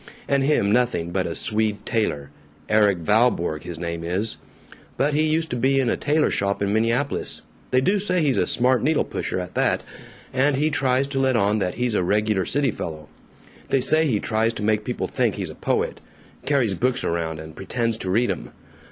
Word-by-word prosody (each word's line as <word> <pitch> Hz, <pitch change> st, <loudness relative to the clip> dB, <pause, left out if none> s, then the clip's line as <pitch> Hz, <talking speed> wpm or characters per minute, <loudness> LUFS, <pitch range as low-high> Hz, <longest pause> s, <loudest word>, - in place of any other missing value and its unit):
And 140 Hz, -1 st, +2 dB
him 135 Hz, -8 st, +2 dB
nothing 120 Hz, -8 st, +1 dB
but 95 Hz, -1 st, -1 dB
a 85 Hz, -, -4 dB
Swede 105 Hz, -1 st, 0 dB
tailor 75 Hz, -, -1 dB, 0.4 s
Erik 105 Hz, -3 st, +4 dB
Valborg 105 Hz, -7 st, +2 dB
his 85 Hz, -2 st, -5 dB
name 85 Hz, 0 st, -4 dB
is. 95 Hz, +6 st, -1 dB, 0.6 s
But 145 Hz, +2 st, +1 dB
he 155 Hz, +2 st, +2 dB
used 160 Hz, +1 st, 0 dB
to -, -, -1 dB
be 135 Hz, +3 st, +2 dB
in 125 Hz, -3 st, +1 dB
a -, -, +1 dB
tailor 150 Hz, +1 st, +1 dB
shop 100 Hz, 0 st, 0 dB
in 100 Hz, 0 st, 0 dB
Minneapolis 115 Hz, +6 st, 0 dB, 0.3 s
(they 130 Hz, -, +3 dB
do 200 Hz, +9 st, +2 dB
say 185 Hz, -2 st, 0 dB
he's 140 Hz, -4 st, +2 dB
a -, -, +1 dB
smart 125 Hz, +1 st, +2 dB
needle 155 Hz, +2 st, +2 dB
pusher, -, -, -3 dB
at 90 Hz, 0 st, -6 dB
that) -, -, +1 dB, 0.5 s
and 135 Hz, +2 st, +2 dB
he 150 Hz, +3 st, +1 dB
tries 130 Hz, -1 st, +1 dB
to 135 Hz, -1 st, -3 dB
let 130 Hz, -1 st, +2 dB
on 105 Hz, -1 st, +2 dB
that 90 Hz, -2 st, -2 dB
he's 125 Hz, -1 st, -1 dB
a 100 Hz, -, +2 dB
regular 105 Hz, +1 st, +1 dB
city 140 Hz, -2 st, +1 dB
fellow. 75 Hz, -5 st, -7 dB, 0.6 s
They 135 Hz, -, +3 dB
say 155 Hz, +5 st, +3 dB
he 110 Hz, -7 st, +1 dB
tries 115 Hz, +1 st, 0 dB
to 105 Hz, -, -5 dB
make 105 Hz, 0 st, +1 dB
people -, -, -2 dB
think -, -, 0 dB
he's -, -, -4 dB
a -, -, -12 dB
poet -, -, -1 dB, 0.5 s
carries 130 Hz, -8 st, +2 dB
books 125 Hz, +6 st, 0 dB
around 80 Hz, -1 st, -2 dB
and 80 Hz, 0 st, -10 dB
pretends 115 Hz, +3 st, -2 dB
to 95 Hz, -, -4 dB
read 115 Hz, +6 st, +2 dB
'em. -, -, -6 dB
115 Hz, 205 wpm, -23 LUFS, 95-135 Hz, 0.6 s, Erik